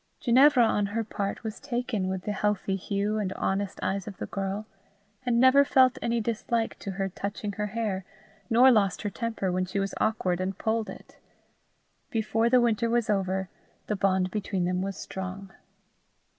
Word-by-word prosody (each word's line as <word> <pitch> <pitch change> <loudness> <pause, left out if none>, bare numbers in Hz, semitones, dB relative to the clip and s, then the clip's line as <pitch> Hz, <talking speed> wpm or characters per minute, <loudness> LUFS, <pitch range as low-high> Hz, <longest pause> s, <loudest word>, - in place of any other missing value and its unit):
Ginevra, 255 0 +6
on 210 -2 +1
her 225 +3 -2
part, 205 -1 -4
was 220 -1 -5
taken 245 -7 -2
with 190 -1 -3
the 210 - -2
healthy 205 -1 0
hue 200 +2 -1
and 195 -3 -2
honest 195 0 -2
eyes 190 0 -1
of 200 -3 -7
the - - -4
girl, 195 +2 -3 0.6
and 235 -1 +3
neither 260 +3 +7
felt 260 -2 +4
any 235 0 0
dislike 230 +1 -1
to 200 - -6
her 195 +1 -1
touching 200 +2 -4
her 210 +1 -3
hair, 210 -3 -2 0.5
nor 250 +3 +7
lost 205 -5 +2
her 205 - -2
temper 225 -3 -2
when 185 +1 0
she 185 +2 -5
was 195 0 -1
awkward 185 -5 +1
and 190 +1 -2
pulled 220 -1 -1
it. - - -12 0.9
Before 225 -1 +1
the 250 +1 +5
winter 235 -1 +2
was 235 -2 +1
over, 190 -1 0 0.4
the 210 - -1
bond 190 -2 +1
between 195 -3 -1
them 180 +1 0
was 195 0 -3
strong. 190 +1 -6
205 Hz, 175 wpm, -27 LUFS, 190-230 Hz, 0.9 s, neither